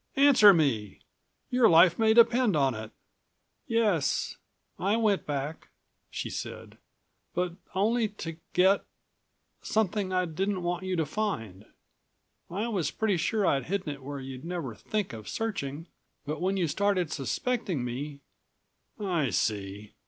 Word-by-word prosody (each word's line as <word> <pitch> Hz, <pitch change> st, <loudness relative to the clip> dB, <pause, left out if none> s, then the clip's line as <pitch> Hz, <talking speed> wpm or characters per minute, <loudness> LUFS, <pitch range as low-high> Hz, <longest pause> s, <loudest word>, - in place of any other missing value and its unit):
Answer 270 Hz, -7 st, +8 dB
me! 125 Hz, -, 0 dB, 0.5 s
Your 250 Hz, -2 st, +5 dB
life 170 Hz, +2 st, +6 dB
may 220 Hz, 0 st, +4 dB
depend 235 Hz, -3 st, +5 dB
on 135 Hz, -2 st, +2 dB
it." 110 Hz, 0 st, -7 dB, 0.8 s
"Yes... 210 Hz, -10 st, +1 dB, 0.4 s
I 200 Hz, +4 st, +1 dB
went 215 Hz, -4 st, +1 dB
back," 145 Hz, +2 st, -4 dB, 0.4 s
she -, -, -4 dB
said. -, -, -7 dB, 0.6 s
"But 180 Hz, 0 st, 0 dB, 0.2 s
only 220 Hz, +4 st, +2 dB
to 165 Hz, -6 st, -7 dB, 0.2 s
get... 190 Hz, +2 st, +4 dB, 0.8 s
something 205 Hz, -2 st, 0 dB
I 185 Hz, 0 st, +1 dB
didn't 185 Hz, +3 st, -2 dB
want 175 Hz, +1 st, -2 dB
you 185 Hz, -1 st, -1 dB
to 165 Hz, -2 st, +1 dB
find. 115 Hz, -, -3 dB, 0.8 s
I 205 Hz, +6 st, -2 dB
was 185 Hz, -10 st, -1 dB
pretty 210 Hz, -1 st, 0 dB
sure 200 Hz, +5 st, 0 dB
I'd 135 Hz, -6 st, +1 dB
hidden 190 Hz, -2 st, -2 dB
it 140 Hz, -, -12 dB
where 140 Hz, +1 st, -6 dB
you'd 130 Hz, 0 st, -8 dB
never 170 Hz, -8 st, -4 dB
think 205 Hz, -, -3 dB
of 110 Hz, -2 st, -8 dB
searching, 165 Hz, -9 st, -3 dB, 0.4 s
but 150 Hz, +2 st, -4 dB
when 190 Hz, +2 st, 0 dB
you 175 Hz, -3 st, +1 dB
started 185 Hz, 0 st, 0 dB
suspecting 180 Hz, -, -2 dB
me 140 Hz, +4 st, -5 dB, 0.4 s
" -, -, -41 dB
"I 175 Hz, -, 0 dB
see. 105 Hz, -1 st, -2 dB
180 Hz, 140 wpm, -28 LUFS, 140-205 Hz, 0.8 s, Answer